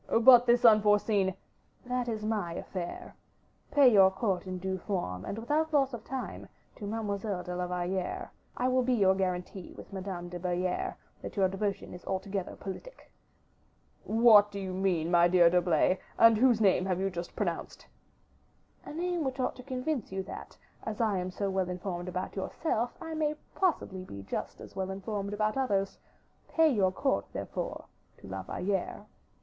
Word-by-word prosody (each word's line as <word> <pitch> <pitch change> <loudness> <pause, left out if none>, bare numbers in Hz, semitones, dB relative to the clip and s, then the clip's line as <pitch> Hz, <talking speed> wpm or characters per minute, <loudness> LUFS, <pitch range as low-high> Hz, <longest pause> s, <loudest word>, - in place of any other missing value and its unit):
"But 245 +1 +8
this 240 0 +5
is - - +1
unforeseen 205 -3 +4 0.2
" - - -36
"That 250 0 -1
is 215 -2 -3
my 210 -6 -1
affair. 175 0 -6 0.5
Pay 275 -5 +6
your 195 -2 +8
court 190 -1 -2
in 185 0 -3
due 190 +1 -3
form, 170 - -3
and 200 - -4
without 300 +8 0
loss 275 -3 +3
of 230 -2 -6
time, 265 0 -6 0.3
to 205 - -6
Mademoiselle 205 -3 -3
de 180 0 -5
la 180 0 -2
Valliere. 180 +1 -3 0.3
I 250 - +1
will 255 0 +3
be 250 0 +2
your 195 -4 +4
guarantee 185 -1 -3
with - - -11
Madame 185 -2 -5
de 175 0 -6
Belliere 180 0 -1 0.3
that - - -7
your 195 -1 +4
devotion 195 +1 -3
is 180 - -10
altogether 190 0 -3
politic." 200 - -9 0.9
"What 220 -2 +6
do 200 -1 -6
you 190 -1 -4
mean, 180 -3 0
my 175 -1 +6
dear 175 -1 +5
D'Herblay, 180 +1 +3 0.2
and 230 0 +7
whose 240 0 +4
name 190 -3 +3
have 185 -1 0
you 195 0 0
just 175 -1 -6
pronounced?" - - -3 1.0
"A - - -8
name 350 0 -1
which 265 -1 -3
ought 255 - 0
to - - -8
convince 260 -2 -3
you 190 0 -3
that, 195 - -9 0.3
as 215 -1 -5
I 215 -5 +2
am 180 0 -3
so 200 +2 -3
well 190 -1 0
informed 180 0 -4
about 180 0 -4
yourself, 235 - -2
I 325 -1 -6
may 305 -1 0 0.2
possibly 300 - 0
be 100 - -9
just - - -5
as - - -11
well 190 -1 -2
informed 200 +1 -4
about 215 +3 0
others. 200 -7 0 0.5
Pay 325 -1 +4
your 195 -6 +2
court, 270 +8 0
therefore, - - -4 0.3
to - - -13
La - - -5
Valliere." 195 +1 -3
195 Hz, 175 wpm, -30 LUFS, 185-235 Hz, 1.0 s, But